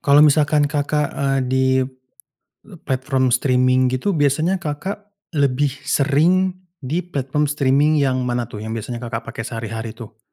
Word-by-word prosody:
Kalau 145 +1 +5
misalkan 150 0 +3
Kakak, 150 -1 0
eee, 135 -1 0
di 130 +1 +1 1.2
platform 130 -1 0
streaming 130 0 +3
gitu 130 +11 -1
biasanya, 155 +6 +1
Kakak 195 +7 -5 0.3
lebih 140 -1 +2
sering 160 +7 +2 0.3
di 155 +7 -2
platform 150 -3 -1
streaming 145 +1 +2
yang 130 -2 +1
mana 120 -1 -1
tuh 105 -3 -8
yang 110 - -5
biasanya, 120 +2 -5
Kakak 115 -1 -5
pakai 115 0 -5
sehari-hari 115 -1 -5
tuh? 110 -1 -11
140 Hz, 140 wpm, -20 LUFS, 125-150 Hz, 1.2 s, Kalau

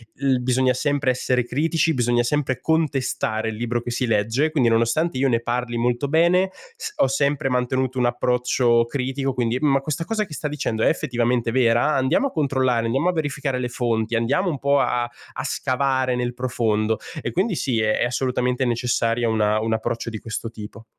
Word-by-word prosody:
l 135 -2 +1
bisogna 125 +1 +2
sempre 140 +1 +1
essere 125 -1 0
critici, 160 +5 +1
bisogna 120 -2 +1
sempre 135 0 -1
contestare 135 -8 0
il 110 - -5
libro 120 +1 -2
che 120 - -5
si 125 +2 -1
legge. 115 +7 +1
Quindi, 140 -6 +2
nonostante 115 +7 +1
io 135 +1 +2
ne 115 -2 +2
parli 120 0 -2
molto 120 +3 0
bene, 175 +4 +3 0.2
s 450 -2 -6
ho - - +4
sempre 140 +1 0
mantenuto 130 +1 -1
un 125 - +2
approccio 120 -1 +2
critico, 135 +2 -2
quindi: 120 -1 0
“Ma 140 -2 +3
questa 150 +3 -3
cosa 220 +1 -1
che 165 - -11
sta 150 - -3
dicendo 130 -7 -2
è - - +4
effettivamente 120 -6 0
vera? 120 +3 +3
Andiamo 130 - +2
a - - -8
controllare, 130 -6 +1
andiamo 135 +9 0
a - - +1
verificare 145 -4 -2
le 125 -1 -2
fonti, 115 -2 -1
andiamo 140 +11 +1
un 145 - -3
po' 140 +1 +2
a 125 -2 +1 0.3
a - - -4
scavare 130 -1 0
nel 125 0 -2
profondo." 110 -3 0 0.2
E - - -3
quindi 190 +2 0
sì, 125 -7 0
è 110 - +1
è - - +1
assolutamente 125 +1 0
necessaria 120 -1 0
una 110 -1 +2
un 110 0 -1
approccio 115 +1 -2
di 110 - -5
questo 110 +1 -5
tipo. 110 0 -10
125 Hz, 190 wpm, -22 LUFS, 120-140 Hz, 0.3 s, ho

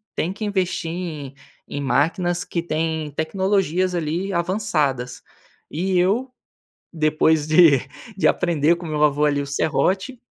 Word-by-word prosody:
tem 170 - -1
que 215 +3 -5
investir 185 -4 -1
em 160 -6 -5 0.3
em 145 - -5
máquinas 170 +5 0
que 170 - -3
têm 160 -2 -2
tecnologias 185 +3 0
ali 170 +3 -2
avançadas, 165 - -1 0.5
e 180 +3 0
eu, 220 +9 +1 0.6
depois 155 -1 +2
de 155 -3 +6 0.4
de 195 - +1
aprender 170 -1 +2
com 170 0 -8
meu 150 -1 -2
avô 150 0 +2
ali 145 -1 +1
o - - -6
serrote, 190 - 0
165 Hz, 135 wpm, -22 LUFS, 150-185 Hz, 0.6 s, de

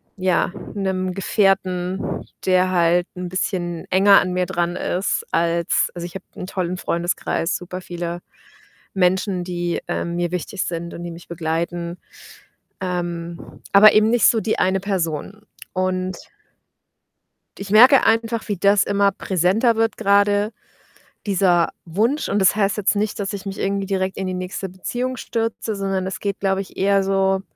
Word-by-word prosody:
ja, 185 -1 +1 0.2
'nem 190 -2 -2
Gefährten, 190 -2 0 0.2
der 185 0 +3
halt 175 0 +3
'n 180 - -4
bisschen 175 -3 -2
enger 195 +1 +6
an 185 - -2
mir 180 0 +1
dran 175 -1 -1
ist 185 +2 -1
als 170 0 +1
also 175 -1 -6
ich 175 - -9
habe 190 - -7
'n 180 - -6
tollen 180 -1 -3
Freundeskreis, 170 -1 -1
super 180 +1 -7
viele 175 -1 -5 0.7
Menschen, 185 0 +1
die, 175 -1 -3
ähm, 170 0 -2
mir 175 0 -1
wichtig 180 +2 -3
sind 170 0 -4
und 175 - -7
die 175 - -5
mich 165 +1 -12
begleiten, 170 +1 -3 0.8
ähm, 175 -2 -5
aber 210 +2 +8
eben 215 +1 +4
nicht 240 -1 +3
so 225 - +5
die 220 0 -1
eine 190 +1 +2
Person 190 +1 -3 0.3
und 185 -1 -1 1.4
ich 200 0 -7
merke 250 +6 +7
einfach, 225 0 +1
wie 205 - -1
das 200 +2 +4
immer 200 0 +2
präsenter 195 +6 +1
wird 225 0 +1
grade, 205 0 +2 0.7
dieser 180 -4 +2
Wunsch, 220 - 0
und 200 - +1
das 190 -1 +5
heißt 200 -1 +1
jetzt 210 0 +1
nicht, 210 +1 -1
dass 200 +1 -2
ich 200 0 -7
mich 195 0 -5
irgendwie 195 0 -1
direkt 190 -1 -1
in 190 - -3
die 185 - -3
nächste 185 +1 -4
Beziehung 245 +8 -4
stürze, 225 -1 -3
sondern 195 -1 -2
es 190 - -5
geht, 200 -1 -2
glaube 195 -1 +1
ich, 195 - -9
eher 195 0 +3
so 195 0 +1
190 Hz, 160 wpm, -21 LUFS, 175-200 Hz, 1.4 s, aber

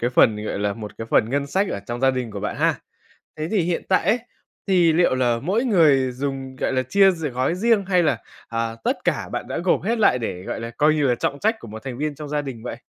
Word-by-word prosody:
cái 120 +1 0
phần, 110 -3 +3
gọi 100 - -3
là, 105 0 0
một 105 -2 -8
cái 115 - -5
phần 110 - +3
ngân 140 0 0
sách 190 +7 0
ở 100 - -3
trong 120 0 -4
gia 135 0 +4
đình 125 -3 -3
của 100 -1 -6
bạn 105 - -3
ha. - - +1 0.6
Thế 155 +1 -3
thì 210 -4 +2
hiện 170 0 -1
tại 185 - +3
ấy, 225 +4 +3 0.5
thì 175 -4 +4
liệu 170 -5 +3
là 120 -2 +1
mỗi 205 - 0
người 145 - +4
dùng, 135 0 -4
gọi - - -1
là, 130 0 +1
chia 195 +8 +4
d 165 -4 -3
gói 130 +5 -1
riêng 215 0 +2
hay 180 -3 +3
là, 150 -4 +1 0.3
à, 115 0 -2
tất - - +1
cả - - 0
bạn - - -5
đã - - -3
gộp 175 +1 +1
hết 225 +4 0
lại 125 -12 +4
để, 90 -6 -4
gọi - - -4
là, 115 0 -5
coi 150 +6 +2
như 150 - 0
là 120 - +3
trọng 140 +4 -2
trách 220 +6 +1
của - - -10
một 110 +4 -9
thành 125 -2 -6
viên 150 0 -2
trong 150 0 -8
gia 150 0 -1
đình 125 -5 -7
vậy? 120 - -5
140 Hz, 275 wpm, -22 LUFS, 120-175 Hz, 0.6 s, gia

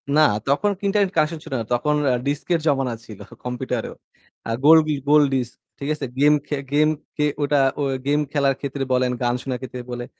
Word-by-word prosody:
না 155 - +6 0.3
তখন 150 +10 +2
internet 200 -1 +2
connection 155 +1 +1
ছিল - - -8
না - - -5
তখন 150 +5 +1 0.2
আ - - +2
ডিস্কের 145 +4 0
জমানা 135 -4 +1
ছিল 110 -4 -11 0.3
কম্পিউটারেও। 125 -1 -3 0.5
আ - - 0
গোল 160 +2 +9
ডি 155 - +1 0.2
গোল 150 0 +6
ডিস্ক। 125 -2 -1 0.3
ঠিক 140 +1 -4
আছে? 150 - -4
গেম 150 +1 +6
খে 150 - -1 0.2
গেম 155 +1 +4 0.3
কে 150 - +2 0.2
ওটা 145 0 +2 0.2
অ - - +1 0.2
গেম 145 +1 +3
খেলার 140 -2 +2
ক্ষেত্রে 140 -1 -3
বলেন 125 0 +2
গান 120 0 +1
শোনার 130 -2 -4
ক্ষেত্রে 125 -1 -6
বলে 120 0 -4
140 Hz, 195 wpm, -22 LUFS, 125-150 Hz, 0.5 s, গোল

